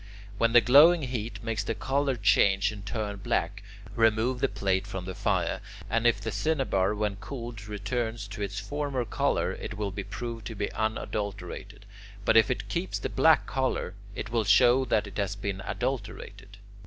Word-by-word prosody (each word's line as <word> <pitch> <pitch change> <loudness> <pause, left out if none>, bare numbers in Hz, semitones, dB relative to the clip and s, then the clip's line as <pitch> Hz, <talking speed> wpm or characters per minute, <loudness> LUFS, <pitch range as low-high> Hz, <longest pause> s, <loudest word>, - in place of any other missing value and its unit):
When 115 0 +3
the 120 - +8
glowing 150 +7 +7
heat 120 -3 -4
makes 110 -2 -2
the - - -2
colour 135 0 0
change 100 -2 +3
and 105 -2 -9
turn 105 0 -3
black, 95 0 -1 0.3
remove 115 +2 +2
the 135 - +2
plate 95 0 0
from 95 -3 -5
the 95 - -5
fire, - - 0 0.3
and 115 +1 +3
if 115 -3 +3
the 110 +2 -4
cinnabar 105 -4 +1
when 105 -1 -1
cooled 115 -3 -7
returns 110 +1 -3
to 105 +1 -7
its 100 -1 -3
former 140 +2 -2
colour, - - 0
it - - -6
will 105 -2 -2
be 100 +1 -5
proved 115 0 -6
to 115 - -6
be 100 0 -2
unadulterated; 105 -2 -4 0.4
but - - +4
if 110 -3 +6
it 100 0 -2
keeps 170 - -2
the - - -3
black 160 -1 +4
colour, 130 -7 -1 0.2
it 110 - -5
will 115 -2 +1
show 120 +6 +5
that 110 -3 +1
it 100 -1 -9
has 100 0 -1
been 100 -1 -4
adulterated. 105 -5 -4
110 Hz, 180 wpm, -28 LUFS, 100-120 Hz, 0.4 s, the